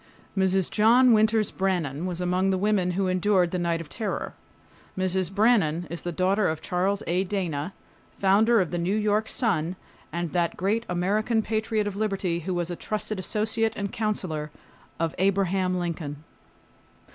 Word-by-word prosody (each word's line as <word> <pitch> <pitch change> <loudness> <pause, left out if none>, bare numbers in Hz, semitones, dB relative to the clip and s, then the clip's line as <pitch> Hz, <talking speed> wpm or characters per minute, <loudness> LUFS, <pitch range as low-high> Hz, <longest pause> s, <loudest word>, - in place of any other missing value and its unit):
Mrs. 190 -1 +1
John 235 +3 +5
Winters 215 -1 +3
Brannan 175 -5 -1
was 180 -1 -4
among 180 +2 +1
the 190 - +2
women 190 -2 +1
who 195 +2 0
endured 185 -1 +2
the 185 - -1
"night 170 -1 0
of 165 - -7
terror." 210 +6 -4 0.6
Mrs. 185 -1 0
Brannan 195 -6 +2
is 170 - -5
the 175 - -3
daughter 185 +4 +2
of 160 0 -2
Charles 185 +4 -1
A. 180 +3 +1
Dana, 180 -5 -2 0.5
founder 215 +4 +4
of 180 -4 0
the 175 - -1
New 180 +4 0
York 215 0 +1
Sun 180 -7 0 0.4
and 170 0 -3
that 170 -2 0
great 210 +5 0
American 210 +6 +1
patriot 220 -1 -1
of 205 -2 -3
liberty 195 -5 -1
who 180 +2 -3
was 175 0 -2
a - - -3
trusted 215 +1 -4
associate 220 +3 0
and 200 -1 -4
counselor 185 -8 -2 0.5
of 165 -1 0
Abraham 190 -1 +1
Lincoln. 160 -4 -4
190 Hz, 160 wpm, -26 LUFS, 175-210 Hz, 0.6 s, John